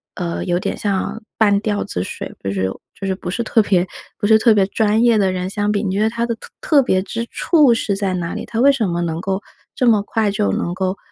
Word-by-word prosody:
呃， 175 -2 -3
有 175 0 0
点 - - -2
像 205 +2 -2
半 205 -2 +4
吊 210 -1 -1
子 90 - -3
水 - - -7
不 100 - -3
是 95 -1 -1 0.3
就 195 - -3
是 190 - 0
不 180 -1 -6
是 235 - -2
特 225 - +3
别 185 -3 +1 0.3
不 205 - -1
是 220 0 +7
特 225 0 +4
别 195 -2 +3
专 215 +2 +1
业 235 -2 +4
的 195 -2 +2
人 185 0 -3
相 205 0 -1
比， 205 -1 0
你 200 - -1
觉 205 - +1
得 220 - +3
他 235 +1 -2
的 235 -1 -2
特 - - -13
特 290 -4 +3
别 185 -6 +1
之 230 +4 -4
处 300 -8 +4
是 215 -3 -1
在 195 -1 -1
哪 175 -1 -3
里？ - - -5
他 225 - -4
为 280 +3 +6
什 225 -8 0
么 170 0 -1
能 165 -1 -2
够 190 +1 -2 0.3
这 250 - 0
么 215 -3 +5
快 210 0 0
就 100 - 0
能 170 - -2
够， 190 +1 -2
205 Hz, 280 characters per minute, -19 LUFS, 185-225 Hz, 0.3 s, 是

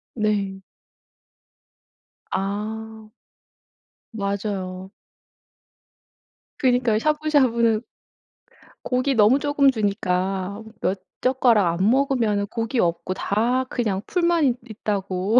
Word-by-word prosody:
네. 205 -3 -1 1.7
아. 215 +3 -4 1.1
맞아요. 200 -2 -3 1.7
그니까요. 245 -4 +2
샤브샤브는 255 -7 +2 1.0
고기 255 +2 +1
너무 225 +5 +5
조금 290 -1 +3
주니까 195 -2 -1 0.2
몇 190 0 -1 0.2
젓가락 230 -9 +3
안 195 +3 +3
먹으면은 240 -6 +1
고기 230 +3 -2
없고 170 0 0
다 230 +7 0
그냥 210 -6 -1
풀만 340 -2 +2
있 255 -3 +2
있다고 200 0 0
220 Hz, 175 characters per minute, -23 LUFS, 195-250 Hz, 1.7 s, 너무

